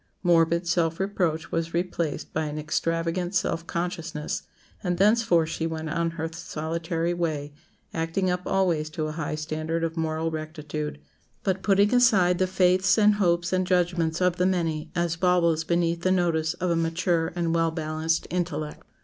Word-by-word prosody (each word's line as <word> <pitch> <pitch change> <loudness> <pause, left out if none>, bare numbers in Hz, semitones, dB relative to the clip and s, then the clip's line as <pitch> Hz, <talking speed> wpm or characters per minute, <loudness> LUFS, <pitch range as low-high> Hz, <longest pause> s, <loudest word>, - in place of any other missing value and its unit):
Morbid 170 0 +3
self 165 -1 +1
reproach 175 -5 -1
was 165 0 -2
replaced 170 -3 -2
by 160 0 0
an 150 0 -4
extravagant 165 +4 -1
self 170 -3 0
consciousness, 170 -3 -3 0.4
and 180 -2 0
thenceforth 195 -5 +3
she 165 0 -2
went 160 -1 -4
on 170 +1 0
her 160 0 -1
solitary 165 +1 -2
way, 155 -4 -2 0.4
acting 165 +4 -1
up 180 0 0
always 170 -5 +1
to 155 0 -3
a 155 - -3
high 155 -1 -3
standard 155 +2 -3
of 165 0 -2
moral 160 0 -1
rectitude, 155 -1 -5 0.4
but 190 -1 0
putting 200 +2 +3
aside 195 -8 +4
the 185 - +2
faiths 185 +1 +3
and 210 -1 +5
hopes 170 -1 +2
and 185 0 +1
judgments 175 -3 +1
of 180 -1 +2
the 180 - +2
many 165 -4 -1
as 170 -1 0
baubles 170 -2 +2
beneath 170 0 0
the 185 - +1
notice 170 -3 +1
of 180 -1 -1
a - - +2
mature 165 0 0
and 170 -2 0
well 165 0 +2
balanced 160 0 -1
intellect. 160 -4 -3
170 Hz, 165 wpm, -26 LUFS, 160-180 Hz, 0.4 s, and